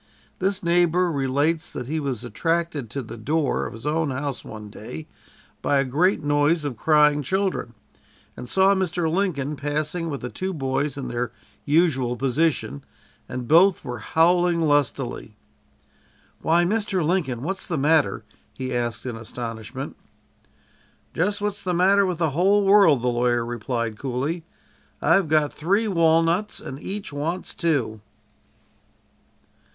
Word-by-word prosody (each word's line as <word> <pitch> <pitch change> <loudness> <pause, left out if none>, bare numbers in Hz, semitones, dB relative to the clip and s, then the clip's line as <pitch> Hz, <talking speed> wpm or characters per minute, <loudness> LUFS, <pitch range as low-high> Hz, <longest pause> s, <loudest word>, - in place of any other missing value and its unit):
This 195 +1 0
neighbor 175 +1 +3
relates 145 +4 0
that - - -5
he 155 +5 -2
was 135 -6 -3
attracted 165 +1 -1
to 140 +3 -4
the 115 - -9
door 145 +6 0
of - - -9
his 115 - -10
own 155 0 0
house 140 0 -3
one 105 -1 -9
day 80 -8 -8 0.6
by 145 - +2
a 135 - +3
great 155 +7 +1
noise 145 +2 +2
of 140 -4 -3
crying 150 +3 +4
children, 185 - -1 0.6
and 125 - -8
saw 190 +1 +4
Mr. 180 -3 0
Lincoln 160 -5 -1
passing 150 +4 -2
with 140 -3 -4
the 125 - -4
two 190 0 -3
boys 140 0 -1
in 135 -2 -4
their 120 0 -2 0.3
usual 145 -6 +2
position, 135 - 0 0.5
and 125 -1 -5
both 175 +3 +5
were 120 -2 -5
howling 170 +6 +3
lustily. 140 -7 0 1.1
"Why, 170 +2 +3
Mr. 195 -2 0
Lincoln, 150 -9 0
what's 190 +5 -4
the 165 - -2
matter?" 150 +2 +2 0.3
he 130 -1 -4
asked 120 -2 -2
in 125 -3 -4
astonishment. 115 -1 -6 1.2
"Just 200 +5 0
what's 205 -1 -2
the 180 -1 -1
matter 195 +3 +4
with 180 -3 -2
the 165 -3 +1
whole 195 +7 +3
world," 195 - +5
the - - +1
lawyer 120 -1 +1
replied 115 -2 -3
coolly. 140 +6 -3 0.5
"I've 170 +3 +3
got 150 -1 +2
three 200 +8 +1
walnuts, 165 +2 +2
and 135 - -8
each 195 -5 -5
wants 165 +6 -3
two." 130 - -1
150 Hz, 145 wpm, -24 LUFS, 130-175 Hz, 1.2 s, both